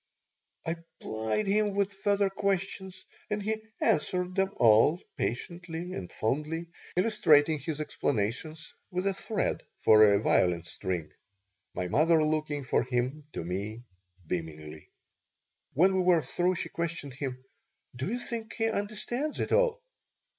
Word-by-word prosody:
I 165 +1 -1 0.2
plied 110 - -1
him 205 0 +2
with 200 0 +1
further 200 0 +1
questions 190 -1 -2 0.2
and 210 0 0
he 220 +1 -1 0.2
answered 180 +3 +1
them 195 +1 +1
all, 115 +9 +5 0.2
patiently 170 +7 -4
and 90 - -6
fondly, 155 +8 -2 0.3
illustrating 160 -6 +4
his 150 +2 -4
explanations 145 +3 -2 0.2
with 180 0 -2
a 195 - +2
thread 210 +2 -2 0.2
for 110 0 +7
a 100 -1 +5
violin 90 -2 +2
string, 85 -1 -4 0.6
my 90 - -2
mother 155 - +4
looking 155 -2 0
from 125 -2 +1
him 130 +4 -1
to - - -4
me 100 +7 -4 0.4
beamingly 80 -2 -5 0.8
When 185 +7 +4
we 185 - +3
were 175 -3 +4
through 180 +1 0
she - - -4
questioned 165 -5 -4
him: 130 -2 -5 0.5
"Do 130 +5 -3
you 240 - 0
think 230 -2 -5
he 225 0 0
understands 225 +8 -2
it - - -1
all?" - - +3
160 Hz, 135 wpm, -29 LUFS, 120-195 Hz, 0.8 s, for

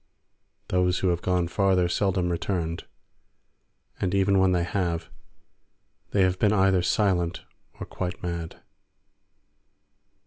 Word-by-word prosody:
Those 90 -1 +2
who 95 - +1
have 85 -1 0
gone 90 -2 0
farther 95 0 +2
seldom 90 0 0
returned, 85 -1 -3 1.1
and 95 0 -1
even 100 0 +3
when 95 -1 +4
they 90 -1 +1
have, 85 -2 -2 1.0
they 100 - +2
have 90 0 +1
been 105 - +3
either 95 -2 +3
silent 90 -3 0 0.4
or - - -5
quite 90 -1 -5
mad. 85 -2 -5
90 Hz, 115 wpm, -26 LUFS, 85-95 Hz, 1.1 s, when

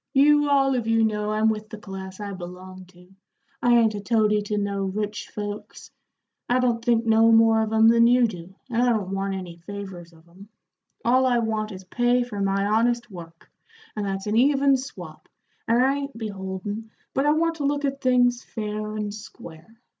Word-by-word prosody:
"You 295 +1 +4
all 270 -1 +3
of 240 -3 -2
you 225 0 +3
know 210 -1 0
I'm 215 +1 +1
with 215 -1 -2
the 220 - -8
class 190 -2 -9
I 205 -1 -5
belong 185 +1 -9
to; 180 0 -20 0.5
I 240 0 +4
ain't 225 -2 +3
a 205 - -4
toady 210 -1 +2
to 210 0 -3
no 200 -1 -2
rich 210 +2 -4
folks; 205 0 -7 0.6
I 245 - +3
don't 240 -2 0
think 235 -1 +2
no 225 0 +5
more 225 0 +5
of 220 0 -2
'em 220 0 +5
than 230 0 +6
you 245 0 +5
do, 185 -3 -7 0.2
and 235 0 +1
I 250 - +3
don't 205 -5 -1
want 195 0 -2
any 180 -3 -7
favors 185 -2 -9
of 165 0 -21
'em 190 +4 -16 0.6
all 255 +2 +4
I 245 -1 +2
want 220 -2 -2
is 190 -1 -9
pay 245 +5 +1
for 210 -5 -6
my 195 0 0
honest 235 +2 +1
work, 165 -2 -12 0.4
and 210 - -3
that's 195 0 -3
an 210 +1 -1
even 275 +2 +4
swap, 185 -12 -8 0.4
and 230 +1 +3
I 275 +1 +1
ain't 280 -3 -6
beholden, 205 0 -5 0.2
but 270 +2 +1
I 295 - +5
want 330 +1 0
to 290 - -3
look 285 0 0
at 275 0 -3
things 245 -1 +2
fair 215 -1 -5
and 210 -1 -3
square. 215 -1 -12
215 Hz, 200 wpm, -24 LUFS, 195-240 Hz, 0.6 s, than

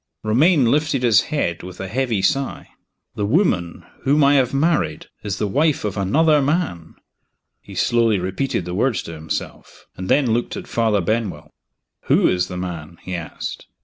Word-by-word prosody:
Romayne 135 +7 +4
lifted 150 -3 +1
his 110 -6 +5
head, 85 - -1
with 90 0 -10
a 95 - -4
heavy 115 -2 -1
sigh. 140 -2 -1 0.4
"The 105 - -3
woman 105 - 0 0.2
whom 145 +2 +3
I 140 +1 +5
have 130 -3 +3
married 140 - 0 0.2
is 100 -2 -3
the 105 - -1
wife 145 +5 +1
of 100 - -2
another 150 - +3
man." 140 - -2 0.7
He - - -12
slowly 115 -3 +2
repeated 95 +4 -2
the 90 - -5
words 110 +2 0
to 85 - -8
himself 80 0 -6
and 95 0 -6
then 130 -6 +3
looked 120 +1 -2
at - - -7
Father 110 -3 +1
Benwell. 110 +2 -2 0.5
"Who - - +4
is 90 0 +1
the 90 - -6
man?" 85 -2 -6
he 90 - -6
asked. 85 -2 -6
110 Hz, 170 wpm, -21 LUFS, 90-140 Hz, 0.7 s, his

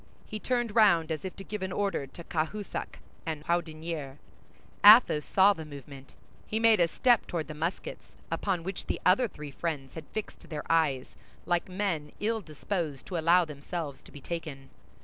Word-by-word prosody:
He 215 - -6
turned 240 -2 -1
round 170 -8 +5
as 155 - -3
if 190 - -5
to 195 - -9
give 210 0 -5
an 190 0 -3
order 195 -8 -1
to 170 +6 -11
Cahusac 170 +6 -3 0.3
and 155 -4 -4
Houdinière. 160 -4 -2 0.7
Athos 205 -8 +8
saw 195 +5 +5
the 160 - -7
movement; 140 -2 -11 0.3
he 215 - -1
made 225 -2 +5
a 170 - +5
step 240 +6 +3
toward 165 -3 -3
the 155 - -6
muskets, 165 +5 -4 0.2
upon 185 -5 -1
which 190 +2 -5
the - - -1
other 195 +7 +5
three 150 -7 -9
friends 140 -4 -4
had 160 -2 -8
fixed 215 - -7
their 150 -3 -4
eyes, 150 -6 +1 0.3
like 175 +1 0
men 180 -6 -2
ill 220 +1 0
disposed 155 -3 -4
to 180 - -4
allow 170 +2 +5
themselves 150 0 -6
to - - -16
be 145 - -11
taken. 150 -4 -6
170 Hz, 175 wpm, -29 LUFS, 150-195 Hz, 0.7 s, Athos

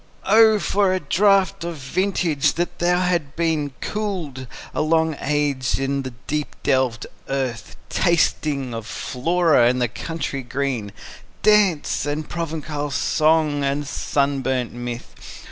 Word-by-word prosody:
O 220 +1 +6
for 200 -2 +1
a - - 0
draught 190 +3 +2
of 170 -1 -4
vintage, 155 0 0
that 175 +1 -1
hath 175 -4 +1
been 160 -3 0
Cooled 175 -12 -4 0.3
a - - 0
long 160 0 +2
age 140 -3 0
in 135 +1 -1
the 130 - -5 0.2
deep 150 0 -3
delved 130 -4 +1 0.2
earth, 130 -6 -3
Tasting 150 -6 +1
of 115 -1 -6
Flora 160 -1 +2
and 125 +1 +1
the 120 - +2
country 140 +3 -4
green, 125 -4 -3 0.5
Dance, 200 -9 +3
and 150 +1 -2
Provençal 155 -3 -4
song, 155 0 +2
and 140 +1 -1
sunburnt 135 -3 -1
mirth! 120 - -6
145 Hz, 125 wpm, -22 LUFS, 135-170 Hz, 0.5 s, O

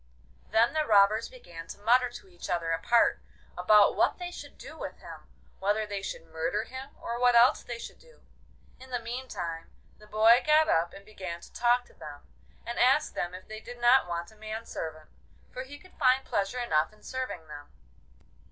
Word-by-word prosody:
Then 225 +2 +3
the 310 -1 +1
robbers 210 +2 +4
began 170 -10 -11
to - - -9
mutter 245 +4 +3
to 240 - -12
each 175 -2 -10
other 170 -2 -1
apart 165 +9 +3 0.4
about 205 +3 +5
what - - +2
they 355 -1 -6
should - - -10
do - - -10
with - - -7
him, - - -12 0.3
whether 205 +3 +1
they 205 -1 -4
should 180 - -6
murder 165 +6 -2
him, 260 +3 -8
or 235 +1 -4
what 245 -1 +4
else 235 +2 +6
they 240 - -6
should - - -10
do. 485 -1 -21 0.6
In 260 0 -13
the 250 - -1
meantime 230 -9 -5 0.3
the 210 - -16
boy 220 +3 +5
got 310 +1 +4
up 170 - +2
and 200 - -13
began 185 -5 -7
to - - -15
talk 245 +1 +2
to - - -21
them, 145 -1 -10 0.4
and 235 +1 -4
ask 265 +5 +4
them 175 +1 -3
if 185 - -11
they 215 0 -7
did 245 +2 -10
not 240 -2 +5
want 170 +2 -4
a - - -19
man 215 +1 -6
servant, 155 -5 -7 0.4
for 255 - -6
he 275 +2 -9
could 370 +5 -19
find 260 +1 +4
pleasure 200 +5 -1
enough 160 -11 +1
in 215 - -23
serving 255 -11 -5
them. 145 -1 -10
220 Hz, 200 wpm, -29 LUFS, 175-250 Hz, 0.6 s, else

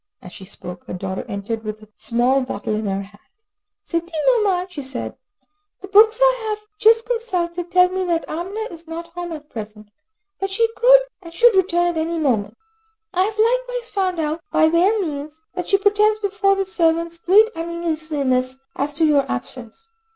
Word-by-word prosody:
As 180 - -12
she 190 - -10
spoke, 180 -1 -10
her - - -5
daughter 190 +1 -4
entered 210 +3 -4
with 215 0 -6
a 215 - -17
small 250 +3 +1
bottle 215 -4 -4
in 215 0 -2
her 195 0 -2
hand. 205 +1 -17 0.6
"Sidi 335 +1 -3 0.2
Nouman," 405 -7 +2
she 360 -6 -7
said, 265 -2 -5 0.7
"the 390 - -8
books 435 +3 +5
I - - +3
have 425 0 -4
just 450 +1 +5
consulted 360 -8 -2
tell 360 0 +5
me 375 +1 -2
that 340 -2 -1
Amina 370 +7 -4
is 335 -1 -11
not 335 +1 -7
home 350 0 -5
at 300 -2 -9
present, 210 -2 -9 0.5
but 390 - -2
she 455 +4 +2 0.6
should 470 +6 +4
return 350 -2 +2
at 345 -1 -1
any 330 +1 -1
moment. 225 -9 0 0.6
I 370 +1 +2
have 430 +1 -4
likewise - - 0
found 375 -3 -1
out 315 +1 -2
by 315 - +4
their 370 +7 +3
means, 305 -3 -5
that 360 -2 -5
she 395 - +5
pretends 420 +1 +3
before 405 -1 +1
the 390 0 -1
servants 335 -2 0
great 405 +6 +5
uneasiness 310 -6 -2 0.2
as 290 +1 -2
to 320 +1 +3
your 290 -3 +2
absence. 235 - -7
340 Hz, 175 wpm, -21 LUFS, 270-395 Hz, 0.7 s, books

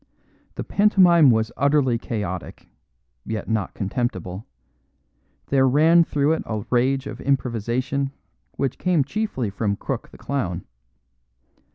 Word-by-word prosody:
The - - -4
pantomime 180 -7 +5
was 110 -1 +2
utterly 140 -4 +2
chaotic, 95 -7 -5 0.6
yet 110 - -4
not 110 -3 -2
contemptible; 95 -2 -3 1.0
there 135 -1 +4
ran 160 +6 +5
through 145 -2 +1
it 160 - -2
a 110 -1 -3
rage 130 +2 +2
of - - -7
improvisation 130 +1 -1 0.4
which 135 -2 -2
came 180 -5 +2
chiefly 135 - -3
from 100 0 -1
Crook - - -5
the - - -15
clown. 95 -11 -3
130 Hz, 115 wpm, -23 LUFS, 110-140 Hz, 1.0 s, pantomime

